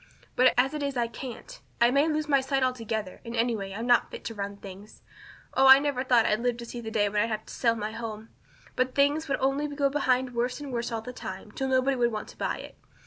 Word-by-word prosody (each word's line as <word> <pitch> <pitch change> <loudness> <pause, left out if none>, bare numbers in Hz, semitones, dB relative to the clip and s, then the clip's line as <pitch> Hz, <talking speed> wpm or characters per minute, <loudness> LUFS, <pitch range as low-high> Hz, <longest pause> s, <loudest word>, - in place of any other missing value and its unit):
But 255 +1 +5
as 265 +4 +3
it 300 - -3
is 280 -2 -2
I 240 - +2
can't. 255 - -8 0.2
I 235 +1 +5
may 280 +4 +3
lose 310 -1 -1
my 275 -2 +3
sight 270 0 0
altogether; 225 -6 -3
and 230 0 -6
anyway 230 -4 -1
I'll 215 +4 -5
not 240 0 +3
be - - -7
fit - - -21
to 225 - -4
run 200 -1 -5
things. 200 +1 -12 0.5
Oh, 265 0 +5
I 265 0 +11
never 280 -2 -1
thought 245 -4 +4
I'd 210 - +2
live 245 0 0
to 240 - -7
see 240 0 -7
the 220 - -5
day 215 -2 +1
when 210 +1 +1
I'd 230 - 0
have 215 -1 -3
to - - -10
sell 230 -2 +2
my 215 -1 -4
home. 225 -1 -7 0.5
But 255 0 0
things 290 +3 +2
would 275 - 0
only 275 +2 +1
go 285 -1 0
behind 260 -3 +1
worse 245 +3 -1
and 285 -3 -7
worse 235 0 -2
all 225 -1 -2
the 250 +2 -7
time, 195 -2 -8
till 265 +4 -3
nobody 260 +1 +2
would 240 -1 +2
want 215 -1 -5
to - - -14
buy - - -2
it. - - -11
245 Hz, 260 wpm, -27 LUFS, 225-270 Hz, 0.5 s, I